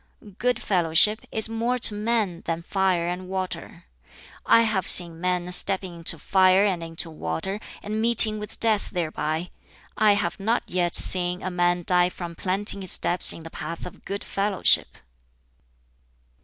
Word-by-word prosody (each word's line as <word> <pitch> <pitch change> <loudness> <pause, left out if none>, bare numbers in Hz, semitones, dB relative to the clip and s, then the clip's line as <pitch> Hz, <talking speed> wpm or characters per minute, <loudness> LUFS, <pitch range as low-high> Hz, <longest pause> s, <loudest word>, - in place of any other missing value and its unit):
"Good 250 0 0
fellowship 180 +3 +1
is 220 0 0
more 230 +3 -2
to 225 - +4
men 210 -5 -2
than 165 0 -4
fire 185 -2 -1
and 180 +1 -5
water. 185 -1 -6 0.6
I 230 - +5
have 215 -4 -2
seen 170 -2 +4
men 180 -1 -2
stepping 185 0 +1
into 165 0 +3
fire 190 +3 +3
and 185 -4 -2
into 165 0 -4
water, 155 - -5 0.2
and 215 +1 -4
meeting 225 -2 +6
with 210 - -9
death 220 -3 +1
thereby; 160 -1 -4 0.4
I 215 -1 +3
have 200 -3 -3
not 225 +4 -1
yet 175 -1 -2
seen 180 0 +3
a 185 - -4
man 175 0 0
die 180 -1 +3
from 175 -2 -8
planting 195 +3 +1
his 185 - -3
steps 175 +1 +1
in 165 - -6
the 165 - -11
path 165 +2 -7
of 180 - -12
good 200 +1 -6
fellowship. 200 -1 0
185 Hz, 155 wpm, -23 LUFS, 175-210 Hz, 0.6 s, meeting